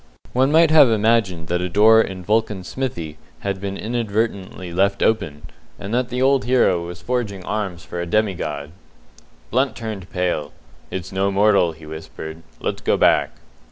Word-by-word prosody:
One 130 Hz, +3 st, +3 dB
might 160 Hz, 0 st, +5 dB
have 150 Hz, -5 st, +7 dB
imagined 110 Hz, -6 st, +1 dB
that 90 Hz, +1 st, 0 dB
a 90 Hz, -, -2 dB
door 110 Hz, +4 st, +6 dB
in 95 Hz, -4 st, -4 dB
Vulcan's 105 Hz, -2 st, 0 dB
Smithy 85 Hz, -, -4 dB, 0.2 s
had 100 Hz, -1 st, -3 dB
been 100 Hz, -1 st, -3 dB
left -, -, -7 dB
inadvertently 105 Hz, -6 st, -2 dB, 0.3 s
open, 85 Hz, -10 st, 0 dB, 0.3 s
and 100 Hz, +3 st, -6 dB
that 125 Hz, 0 st, 0 dB
the 125 Hz, +1 st, -1 dB
old 135 Hz, -1 st, +3 dB
hero 120 Hz, -9 st, +3 dB
was 90 Hz, +1 st, -8 dB
forging 110 Hz, -7 st, -2 dB
arms 95 Hz, -6 st, -3 dB
for 85 Hz, -, -5 dB
a 85 Hz, -, -4 dB
demigod. 85 Hz, -8 st, -1 dB, 0.8 s
Blunt 130 Hz, +3 st, +1 dB
turned 110 Hz, -5 st, -6 dB
pale. 90 Hz, -5 st, -2 dB, 0.4 s
"It's 95 Hz, -3 st, -5 dB
no 95 Hz, +1 st, +1 dB
mortal," 100 Hz, -4 st, +3 dB
he 80 Hz, 0 st, -14 dB
whispered. 80 Hz, +1 st, -8 dB, 0.2 s
"Let's -, -, -3 dB
go -, -, +2 dB
back." -, -, +4 dB
100 Hz, 160 wpm, -21 LUFS, 85-115 Hz, 0.8 s, have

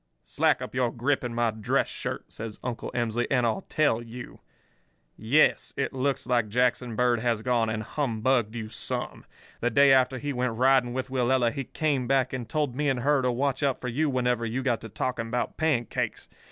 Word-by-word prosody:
"'Slack -, -, +1 dB
up -, -, -7 dB
your 125 Hz, -1 st, +1 dB
grip 130 Hz, +4 st, 0 dB
in 125 Hz, -, -3 dB
my 120 Hz, -1 st, +2 dB
dress 110 Hz, -1 st, 0 dB
shirt,' -, -, -5 dB
says 110 Hz, -1 st, -7 dB
Uncle 125 Hz, -2 st, -4 dB
Emsley, 120 Hz, 0 st, 0 dB
'and 125 Hz, -3 st, +2 dB
I'll 115 Hz, +11 st, -1 dB
tell 150 Hz, -7 st, +2 dB
you. 120 Hz, +1 st, -9 dB, 0.8 s
Yes, 130 Hz, +8 st, +2 dB
it 140 Hz, 0 st, -1 dB
looks 135 Hz, 0 st, -1 dB
like 120 Hz, -3 st, +1 dB
Jackson 125 Hz, 0 st, +1 dB
Bird 120 Hz, 0 st, +2 dB
has 115 Hz, -2 st, 0 dB
gone 120 Hz, -3 st, +1 dB
and 110 Hz, 0 st, -2 dB
humbugged 120 Hz, -3 st, 0 dB
you 110 Hz, -2 st, -4 dB
some. -, -, -5 dB, 0.3 s
The 120 Hz, -, +1 dB
day 140 Hz, +3 st, +6 dB
after 130 Hz, 0 st, +3 dB
he 145 Hz, +2 st, -3 dB
went 125 Hz, -2 st, -1 dB
riding 130 Hz, -1 st, +3 dB
with 130 Hz, 0 st, -4 dB
Willella 125 Hz, -2 st, +2 dB
he 135 Hz, -, -4 dB
came 140 Hz, -5 st, -1 dB
back 135 Hz, -1 st, +2 dB
and 125 Hz, -3 st, -5 dB
told 150 Hz, -5 st, -1 dB
me 145 Hz, +1 st, +1 dB
and 130 Hz, -2 st, 0 dB
her 145 Hz, +1 st, +3 dB
to 125 Hz, -1 st, +1 dB
watch 130 Hz, +2 st, -1 dB
out 140 Hz, -3 st, +1 dB
for 125 Hz, -, -4 dB
you 150 Hz, +6 st, 0 dB
whenever 125 Hz, -3 st, 0 dB
you 120 Hz, +3 st, -2 dB
got 120 Hz, -4 st, 0 dB
to 115 Hz, -, -8 dB
talking 115 Hz, +2 st, -3 dB
about 120 Hz, +1 st, -2 dB
pancakes. 145 Hz, -8 st, -1 dB
125 Hz, 200 wpm, -27 LUFS, 115-135 Hz, 0.8 s, day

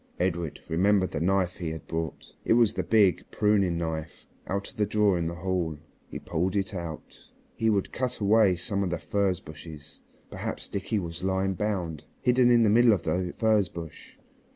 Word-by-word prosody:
Edred 85 Hz, -3 st, -1 dB
remembered 95 Hz, +3 st, +2 dB
the -, -, -2 dB
knife 90 Hz, +1 st, +1 dB
he 85 Hz, -3 st, -3 dB
had 80 Hz, 0 st, -7 dB
brought. 80 Hz, -1 st, -5 dB
It -, -, +3 dB
was 115 Hz, -2 st, +4 dB
the -, -, -1 dB
big 100 Hz, -6 st, +3 dB
pruning 100 Hz, -5 st, +2 dB
knife 80 Hz, -1 st, -4 dB, 0.2 s
out 100 Hz, +1 st, -3 dB
of -, -, -24 dB
the 105 Hz, -, +2 dB
drawer 105 Hz, -2 st, +3 dB
in 85 Hz, -1 st, -1 dB
the 85 Hz, -, -4 dB
hall. 85 Hz, -3 st, -2 dB, 0.3 s
He -, -, -7 dB
pulled 90 Hz, +4 st, -2 dB
it 100 Hz, 0 st, -1 dB
out. 85 Hz, -4 st, -7 dB, 0.4 s
He 115 Hz, -, +1 dB
would 100 Hz, -3 st, 0 dB
cut 125 Hz, 0 st, -2 dB
away 105 Hz, -2 st, +4 dB
some 100 Hz, +3 st, -2 dB
of 95 Hz, -, -1 dB
the 85 Hz, -, -1 dB
furze 100 Hz, 0 st, 0 dB
branches. 75 Hz, 0 st, -11 dB, 0.3 s
Perhaps -, -, -5 dB
Dickie 100 Hz, +3 st, -2 dB
was 85 Hz, -2 st, -5 dB
lying 95 Hz, 0 st, 0 dB
bound, 90 Hz, -7 st, -3 dB
hidden 125 Hz, 0 st, +4 dB
in 120 Hz, -1 st, +5 dB
the -, -, +4 dB
middle 120 Hz, +1 st, +6 dB
of 90 Hz, -5 st, -1 dB
the 90 Hz, -1 st, -1 dB
furze 110 Hz, -4 st, +3 dB
bush. 80 Hz, -2 st, -10 dB
95 Hz, 190 wpm, -27 LUFS, 85-105 Hz, 0.4 s, middle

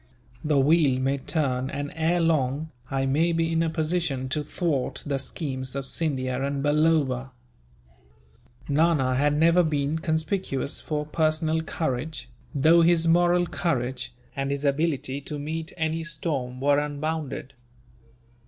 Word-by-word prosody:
The 150 Hz, -1 st, +2 dB
wheel 140 Hz, -2 st, +4 dB
may 135 Hz, +1 st, 0 dB
turn 130 Hz, -4 st, -1 dB
and, 145 Hz, 0 st, -4 dB
ere 165 Hz, +2 st, +1 dB
long, 155 Hz, -2 st, +1 dB, 0.2 s
I 135 Hz, 0 st, 0 dB
may 155 Hz, +6 st, +2 dB
be 165 Hz, 0 st, +1 dB
in 165 Hz, 0 st, +2 dB
a 165 Hz, -, +1 dB
position 160 Hz, -5 st, -1 dB
to 150 Hz, +3 st, -1 dB
thwart 150 Hz, -3 st, -2 dB
the 140 Hz, -1 st, -1 dB
schemes 130 Hz, -3 st, -4 dB
of 135 Hz, -1 st, -3 dB
Scindia 130 Hz, -4 st, -1 dB
and 140 Hz, 0 st, -2 dB
Balloba." 145 Hz, -4 st, +2 dB, 1.4 s
Nana 150 Hz, -3 st, +2 dB
had 145 Hz, +2 st, +2 dB
never 165 Hz, +3 st, +5 dB
been 150 Hz, -1 st, 0 dB
conspicuous 160 Hz, -3 st, -2 dB
for 150 Hz, -1 st, -2 dB
personal 155 Hz, +1 st, +1 dB
courage, 155 Hz, -1 st, -3 dB, 0.3 s
though 160 Hz, +5 st, +5 dB
his 165 Hz, 0 st, +4 dB
moral 175 Hz, +1 st, +4 dB
courage, 130 Hz, -7 st, -2 dB, 0.2 s
and 135 Hz, 0 st, -2 dB
his 140 Hz, +1 st, -2 dB
ability 140 Hz, -2 st, 0 dB
to 150 Hz, +1 st, -5 dB
meet 160 Hz, +2 st, -4 dB
any 160 Hz, 0 st, -1 dB
storm 135 Hz, -7 st, -3 dB
were 140 Hz, +1 st, +3 dB
unbounded. 150 Hz, -2 st, -3 dB
150 Hz, 135 wpm, -26 LUFS, 135-160 Hz, 1.4 s, never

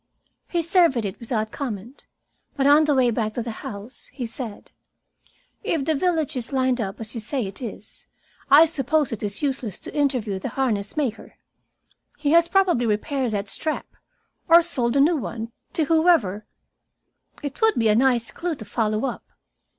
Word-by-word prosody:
He 345 Hz, -2 st, -1 dB
surveyed 330 Hz, -, +4 dB
it 190 Hz, -, -5 dB
without 220 Hz, -2 st, -2 dB
comment, 235 Hz, -1 st, -6 dB, 0.5 s
but 270 Hz, -, 0 dB
on 295 Hz, +2 st, +6 dB
the 295 Hz, -2 st, +2 dB
way 250 Hz, -2 st, +3 dB
back 215 Hz, -1 st, -2 dB
to 240 Hz, -, -2 dB
the 230 Hz, -, -4 dB
house 210 Hz, +5 st, -9 dB
he 255 Hz, -, -5 dB
said: 230 Hz, -2 st, -6 dB, 0.9 s
"If 300 Hz, -5 st, -1 dB
the 320 Hz, -, +2 dB
village 315 Hz, -1 st, 0 dB
is 250 Hz, 0 st, -5 dB
lined 260 Hz, -2 st, +1 dB
up 195 Hz, -2 st, -4 dB
as 225 Hz, 0 st, -6 dB
you 230 Hz, -, -4 dB
say 245 Hz, +2 st, -2 dB
it 195 Hz, +4 st, -8 dB
is, 220 Hz, -3 st, -9 dB, 0.4 s
I 290 Hz, +4 st, +8 dB
suppose 300 Hz, -2 st, 0 dB
it 225 Hz, -, -4 dB
is 205 Hz, +5 st, -4 dB
useless 260 Hz, -8 st, -2 dB
to -, -, -8 dB
interview 250 Hz, -9 st, 0 dB
the -, -, -4 dB
harness 220 Hz, -4 st, -1 dB
maker. 255 Hz, -7 st, -3 dB, 0.8 s
He 290 Hz, -, 0 dB
has 335 Hz, +1 st, +5 dB
probably 350 Hz, -10 st, +2 dB
repaired 250 Hz, +5 st, -1 dB
that 200 Hz, 0 st, -2 dB
strap, 310 Hz, +9 st, -2 dB, 0.6 s
or 335 Hz, +1 st, +7 dB
sold 255 Hz, -7 st, 0 dB
a -, -, +4 dB
new 315 Hz, +4 st, +4 dB
one, 230 Hz, -3 st, -5 dB, 0.2 s
to 320 Hz, -, +2 dB
whoever 315 Hz, -, +2 dB, 1.0 s
It 285 Hz, -, -6 dB
would 445 Hz, 0 st, +4 dB
be 225 Hz, -, +2 dB
a -, -, +5 dB
nice 245 Hz, -1 st, +2 dB
clue 345 Hz, -2 st, -3 dB
to 220 Hz, -, -10 dB
follow 215 Hz, +2 st, -1 dB
up." -, -, -4 dB
255 Hz, 175 wpm, -23 LUFS, 220-305 Hz, 1.0 s, I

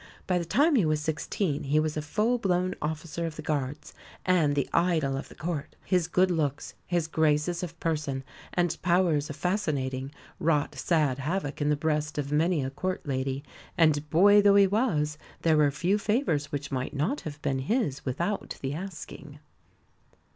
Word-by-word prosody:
By 180 Hz, -1 st, +1 dB
the 170 Hz, -, -3 dB
time 285 Hz, -, +3 dB
he 240 Hz, -8 st, +4 dB
was 155 Hz, -1 st, +1 dB
sixteen 155 Hz, +1 st, -2 dB
he 145 Hz, +3 st, +3 dB
was 155 Hz, -1 st, -1 dB
a 155 Hz, -, -1 dB
full 220 Hz, +10 st, 0 dB
blown 185 Hz, -2 st, +1 dB
officer 160 Hz, +2 st, -3 dB
of 160 Hz, -, -6 dB
the 155 Hz, -, -7 dB
Guards, 145 Hz, -1 st, -3 dB, 0.3 s
and 165 Hz, -6 st, +3 dB
the 140 Hz, -, 0 dB
idol 160 Hz, -6 st, +2 dB
of 135 Hz, -, -5 dB
the -, -, -13 dB
Court. 160 Hz, -3 st, -4 dB
His 180 Hz, -3 st, +2 dB
good 185 Hz, +2 st, +3 dB
looks, 145 Hz, -5 st, -1 dB
his 175 Hz, -3 st, +1 dB
graces 160 Hz, +2 st, +1 dB
of 170 Hz, -2 st, -6 dB
person, 150 Hz, -5 st, -2 dB, 0.3 s
and 175 Hz, -2 st, 0 dB
powers 170 Hz, -5 st, +2 dB
of 145 Hz, -, -5 dB
fascinating 140 Hz, -9 st, -1 dB, 0.3 s
wrought 150 Hz, -3 st, +1 dB
sad 150 Hz, -6 st, +1 dB
havoc 150 Hz, 0 st, -2 dB
in 145 Hz, -, +2 dB
the 150 Hz, -, +3 dB
breast 150 Hz, 0 st, -1 dB
of 145 Hz, -1 st, -2 dB
many 160 Hz, 0 st, +2 dB
a 130 Hz, -, -3 dB
Court 185 Hz, +6 st, -3 dB
lady; 135 Hz, 0 st, -2 dB, 0.3 s
and, 155 Hz, -3 st, +3 dB
boy 205 Hz, +6 st, +6 dB
though 200 Hz, 0 st, +5 dB
he 200 Hz, -1 st, +7 dB
was, 170 Hz, -8 st, 0 dB, 0.2 s
there 160 Hz, -2 st, +4 dB
were 150 Hz, -1 st, +5 dB
few 180 Hz, +8 st, 0 dB
favours 200 Hz, -, 0 dB
which 145 Hz, -1 st, -4 dB
might 130 Hz, +2 st, -3 dB
not 170 Hz, -, 0 dB
have 150 Hz, -2 st, -7 dB
been 135 Hz, -1 st, 0 dB
his 150 Hz, -, -1 dB
without 170 Hz, +10 st, -2 dB
the 135 Hz, +1 st, -1 dB
asking. 160 Hz, -4 st, -8 dB
155 Hz, 180 wpm, -28 LUFS, 145-180 Hz, 0.3 s, he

